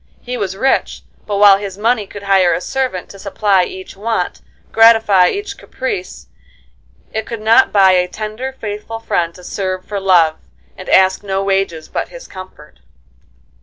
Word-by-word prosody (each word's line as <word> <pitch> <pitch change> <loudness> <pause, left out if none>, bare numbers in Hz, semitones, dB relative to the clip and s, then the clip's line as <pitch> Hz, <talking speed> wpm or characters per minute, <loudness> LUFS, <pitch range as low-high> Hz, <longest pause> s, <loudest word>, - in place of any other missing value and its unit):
He 250 0 -5
was 195 -5 -4
rich, 270 +5 0 0.2
but 205 -1 -2
while 200 -1 +7
his 200 -2 -7
money 220 -1 0
could 205 +1 -10
hire 190 -3 +3
a - - -2
servant 255 -3 -3
to 195 - -12
supply 200 -2 +1
each 185 0 -10
want, 210 -2 -3 0.3
gratify 225 -5 +5
each 410 +1 -5
caprice, 195 -8 -5 0.9
it 220 0 -3
could 230 - -5
not 220 +1 +4
buy 195 -2 +5
a 180 -1 +2
tender, 215 +7 -5
faithful 210 +1 -6
friend 170 -6 -1
to 180 - -14
serve 185 -1 -4
for 205 -1 -4
love, 175 -5 +3 0.4
and - - -10
ask 190 0 +4
no 195 -1 -2
wages 195 -5 -1
but - - -4
his - - -11
comfort. 185 - -12
200 Hz, 165 wpm, -16 LUFS, 185-220 Hz, 0.9 s, while